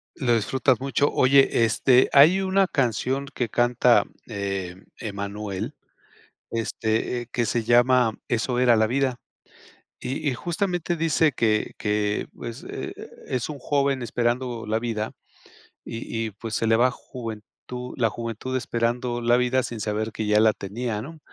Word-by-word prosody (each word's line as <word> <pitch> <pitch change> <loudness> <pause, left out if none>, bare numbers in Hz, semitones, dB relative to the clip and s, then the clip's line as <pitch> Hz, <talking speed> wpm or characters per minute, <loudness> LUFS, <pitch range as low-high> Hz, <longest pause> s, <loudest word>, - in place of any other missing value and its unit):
Lo 120 -3 +2
disfrutas 125 +3 +1
mucho. 140 +2 +1
Oye, 130 -2 +4
este 125 +3 +4
hay 155 +7 +7
una 190 0 +2
canción 130 0 0
que 120 -3 -2
canta, 120 0 +4 0.2
eh, 100 -4 -4 0.2
Emmanuel, 100 -1 -4 0.8
este, 115 +1 -1
eh, 120 - -9
que 120 - 0
se 115 +2 0
llama 120 0 +4
Eso 120 +1 0
era 125 -1 +5
la 110 0 +3
vida. 130 0 0 0.8
Y 135 +4 -3
y 130 - 0
justamente, 175 - -2
dice 160 -1 +2
que 110 -4 0
que, 105 0 0
pues, 115 -1 -8
eh, - - -5 0.4
es 125 -3 -2
un 150 -2 -6
joven 140 -1 +1
esperando 120 0 -1
la 110 +1 0
vida, 110 -2 -3 0.7
y 115 - -6 0.3
y - - -7
pues, 110 +3 -7
se 115 - 0
le 110 0 +4
va 125 +2 +4
juventud 115 -4 -8 0.5
la 115 -3 +2
juventud 115 +3 -5
esperando 120 0 -1
la 120 0 +4
vida 125 +1 +2
sin 120 -2 -5
saber 110 +1 -2
que 110 - -3
ya 105 0 +4
la 110 0 +5
tenía, 105 +2 -4
¿no? 155 +7 -9
120 Hz, 150 wpm, -24 LUFS, 110-130 Hz, 0.8 s, hay